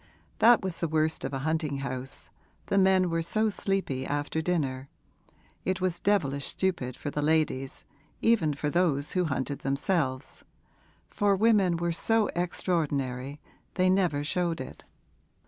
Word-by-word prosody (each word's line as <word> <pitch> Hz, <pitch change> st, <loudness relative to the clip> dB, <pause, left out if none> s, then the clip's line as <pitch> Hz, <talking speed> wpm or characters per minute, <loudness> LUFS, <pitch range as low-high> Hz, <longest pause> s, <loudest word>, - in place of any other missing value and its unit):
That 235 Hz, -1 st, +6 dB
was 185 Hz, -3 st, -3 dB
the 170 Hz, -, 0 dB
worst 155 Hz, 0 st, 0 dB
of -, -, -3 dB
a 135 Hz, -, -2 dB
hunting 155 Hz, -3 st, -1 dB
house 130 Hz, -1 st, -6 dB, 0.3 s
the 200 Hz, -, +2 dB
men 190 Hz, -2 st, +4 dB
were 165 Hz, 0 st, 0 dB
so 215 Hz, +6 st, +1 dB
sleepy 195 Hz, -11 st, -2 dB
after 145 Hz, +3 st, -2 dB
dinner; 140 Hz, -6 st, -2 dB, 0.7 s
it 185 Hz, -1 st, -1 dB
was 180 Hz, -2 st, -1 dB
devilish 140 Hz, -9 st, +1 dB
stupid 155 Hz, -10 st, -1 dB
for 145 Hz, -, -5 dB
the 150 Hz, -, -2 dB
ladies, 150 Hz, -3 st, 0 dB, 0.3 s
even 170 Hz, -11 st, +2 dB
for 150 Hz, +1 st, -2 dB
those 150 Hz, -5 st, +1 dB
who 180 Hz, -2 st, +1 dB
hunted 140 Hz, -2 st, -2 dB
themselves 135 Hz, -1 st, -1 dB, 0.7 s
for 205 Hz, -1 st, +2 dB
women 200 Hz, -4 st, +3 dB
were 170 Hz, 0 st, -1 dB
so 225 Hz, +5 st, +2 dB
extraordinary, 145 Hz, -6 st, -1 dB, 0.4 s
they 185 Hz, -1 st, +3 dB
never 175 Hz, -7 st, +1 dB
showed 170 Hz, +2 st, -1 dB
it. 130 Hz, -, -9 dB
160 Hz, 145 wpm, -28 LUFS, 140-185 Hz, 0.7 s, That